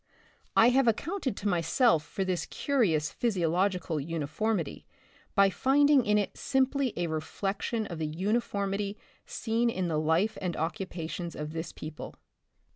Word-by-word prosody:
I 230 - +7
have 260 0 +3
accounted 275 - 0
to 205 - -3
myself 175 - +3
for 190 +4 -3
this 185 -2 -1
curious 180 - +1
physiological 180 -5 0
uniformity 165 +5 -2 0.5
by 200 0 +5
finding 280 +2 +4
in 210 0 +4
it 205 - -1
simply 265 -1 +1
a 175 - 0
reflection 195 +7 -2
of 170 -5 -6
the 155 - -1
uniformity 200 +3 -1 0.3
seen 230 +1 0
in 185 -6 -1
the 155 -2 +1
Hfe 165 +8 +1
and 180 -3 -2
occupations 170 -1 -4
of 150 +1 -5
this 165 +1 -4
people. 155 0 -8
195 Hz, 135 wpm, -29 LUFS, 165-230 Hz, 0.5 s, I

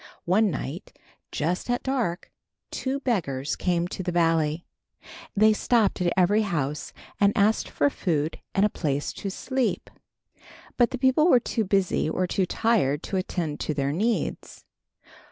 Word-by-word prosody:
One 205 +4 +3
night, 155 - -6 0.3
just 175 +9 -2
at 245 0 0
dark, 240 -10 -2 0.4
two 275 +1 -3
beggars 150 - -1
came 175 -2 0
into 180 +2 -5
the 180 -1 -2
valley. 165 -1 +1 0.7
They 215 +1 +6
stopped 215 -3 +1
at 175 -1 +2
every 195 +4 +4
house 150 -8 -2 0.3
and 200 0 +3
asked 210 +2 +2
for 145 - +1
food 160 -4 -1 0.2
and 195 - +4
a - - +2
place 145 -6 -2
to 200 - -5
sleep. 260 +6 -2 0.8
But 240 -2 +3
the 260 - -4
people 260 +5 +3
were 250 - +6
too 225 -2 -2
busy 190 -4 +1
or 185 +3 0
too 180 +1 0
tired 175 - +1
to 195 - -2
attend 175 -5 -3
to 155 - -2
their 140 0 0
needs. 215 +9 -2
185 Hz, 155 wpm, -25 LUFS, 160-220 Hz, 0.8 s, They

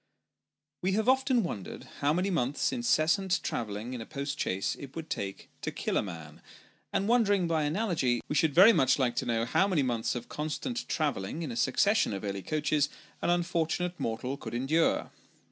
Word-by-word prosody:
WE 190 +1 +1
have 220 +3 0
often 260 -2 +3
wondered 105 - -5 0.2
how 145 - +2
many 185 +5 0
months' 145 -5 0
incessant 190 -4 +2
travelling 110 +2 -3
in. 125 - -5
a - - -6
post 140 0 -4
chaise 95 +1 -1
it 140 -1 -10
would 165 -1 -7
take 95 -1 -4
to - - -2
kill - - -3
a - - +3
man; 80 -6 -8 0.5
and 195 - 0
wondering 205 -6 +3
by 165 -2 +1
analogy, 150 - +1
we - - -2
should 150 -1 +2
very 200 +6 +9
much 130 -8 +3
like 130 -4 +1
to - - -1
know 115 -1 +1
how 190 +10 +2
many 175 -8 +2
months 120 -3 -1
of 120 -1 -5 0.6
travelling 145 -1 -2
in 145 - -4
a - - -5
succession 205 - +2
of 100 - -5
early 100 -1 -3
coaches, 150 +2 0 0.3
an - - 0
unfortunate 175 0 0
mortal 125 +4 -2
could - - -7
endure. 150 +7 +1
150 Hz, 180 wpm, -30 LUFS, 120-180 Hz, 0.6 s, very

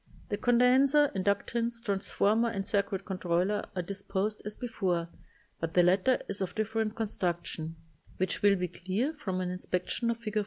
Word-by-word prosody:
The 205 - -1
condenser, 260 +5 +4
inductance, 230 +4 0
trans 200 -2 -1
former 225 +3 +3
and 195 -3 -3
circuit 200 -1 0
controller 185 +2 0
are 180 - -1
disposed 200 +2 -2
as 210 - -5
before, 185 -8 -1 0.5
but 165 0 -3
the 180 - +6
latter 190 +8 +4
is 200 0 -2
of 180 -2 -3
different 220 0 -1
con 225 - -1
struction, 170 -4 -3 0.4
which 185 +2 -1
will 205 -1 +6
be 180 -1 -1
clear 190 - -2
from 190 -12 -3
an 180 -1 -2
inspection 180 +5 -2
of 235 - 0
Fig. 215 -2 -4
200 Hz, 165 wpm, -30 LUFS, 185-225 Hz, 0.5 s, the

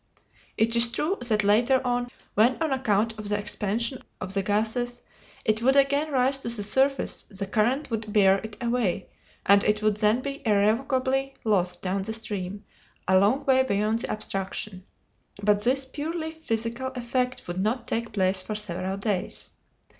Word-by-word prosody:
It 230 +1 +2
is 235 +1 +6
true 305 +10 -1
that 215 -2 +3
later 235 +6 +4
on, 245 0 0 0.2
when, 235 +5 +4
on 320 -3 0
account 225 -3 0
of 210 -1 -5
the 205 - +1
expansion 210 +5 -2 0.2
of 190 - -4
the 195 - +1
gases, 225 +5 -1 0.4
it 215 +1 +2
would 265 +3 +3
again 280 +2 +3
rise 265 0 +3
to 235 - -4
the 230 -3 0
surface, 265 +6 +1
the 195 -1 -4
current 240 +8 0
would 215 -1 -3
bear 195 -2 +5
it 220 0 -8
away, 235 -6 0 0.4
and 200 +1 +6
it 210 0 +1
would 215 -1 +2
then 215 +3 +2
be 275 +1 -5
irrevocably 260 +5 +1
lost 180 -5 0
down 190 +1 -1
the 220 +3 -4
stream, 205 -2 -4 0.4
a 190 0 +5
long 235 +9 +2
way 260 -1 +5
beyond 215 -2 0
the - - -3
obstruction. 195 -2 -4 0.6
But 205 0 +3
this 265 +3 +2
purely 315 +4 -4
physical 235 -5 -3
effect 250 0 -2
would 175 +1 -3
not 230 +4 -1
take 230 0 -2
place 190 -2 +1
for 215 +3 -5
several 190 -2 -3
days. 200 -2 -2
220 Hz, 170 wpm, -26 LUFS, 205-255 Hz, 0.6 s, is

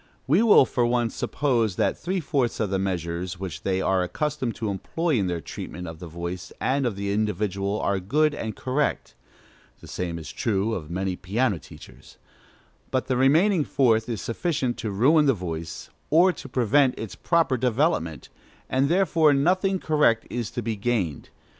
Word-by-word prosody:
We 160 +10 +4
will, 220 - +7
for 125 - 0
once, 120 -1 +1
suppose 120 -9 0
that - - +1
three 185 +3 -2
fourths 140 -7 -1
of 105 -3 -1
the 95 - +1
measures 90 -1 -3
which 85 -4 -6
they 95 -1 0
are 95 -1 +2
accustomed 135 +5 -2
to 110 -3 -2
employ 165 - -2
in 95 - 0
their 85 -2 -2
treatment 90 +4 -7
of 80 -1 -8
the 90 - -8
voice 85 +2 -6
and 135 -1 +1
of 110 - -3
the 100 0 -2
individual 100 -1 -1
are 100 -1 0
good 150 +11 +2
and 110 -7 -5
correct 140 +3 -1 0.7
(the - - -13
same 85 -2 -4
is 80 - -8
true 110 0 -1
of 80 -8 -5
many 95 +1 -2
piano 100 +2 0
teachers); - - -15 0.7
but 130 - 0
the 130 - 0
remaining 155 +8 +4
fourth 115 -5 +2
is 115 -4 -3
sufficient 130 -1 -1
to 110 - -3
ruin 145 +10 +4
the 135 - +4
voice, 85 -3 -6 0.2
or 175 +4 +5
to 135 - -10
prevent 130 +2 +2
its 110 -5 -6
proper 165 -6 +1
development, 125 - 0 0.4
and 135 +2 +2
therefore 165 -5 +3
nothing 185 +7 +2
correct 150 -10 +2
is 120 -3 -3
to 120 - -5
be 110 0 -2
gained. 100 -8 -2
115 Hz, 175 wpm, -25 LUFS, 95-140 Hz, 0.7 s, will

